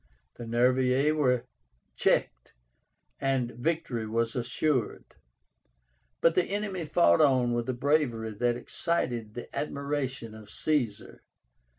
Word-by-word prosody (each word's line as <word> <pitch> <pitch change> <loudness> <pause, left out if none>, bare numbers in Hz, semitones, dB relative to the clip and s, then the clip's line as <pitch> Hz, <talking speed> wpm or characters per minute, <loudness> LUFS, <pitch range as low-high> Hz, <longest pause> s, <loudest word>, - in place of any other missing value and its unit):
The 120 - -7
Nervii 130 +5 +3
were 125 -5 +2 0.5
checked, - - 0 0.7
and 130 -3 0
victory 120 -4 -2
was 115 +1 -1
assured. 125 0 0 1.2
But 165 - +5
the 180 0 +2
enemy 200 -4 -3
fought 165 +1 +4
on 130 -5 +3
with 120 +1 -2
a - - +1
bravery 125 -4 0
that 120 +3 0
excited 120 -6 -2
the 120 - -8
admiration 140 -5 -3
of 110 -1 -12
Caesar. 120 -5 -1
125 Hz, 110 wpm, -28 LUFS, 120-150 Hz, 1.2 s, But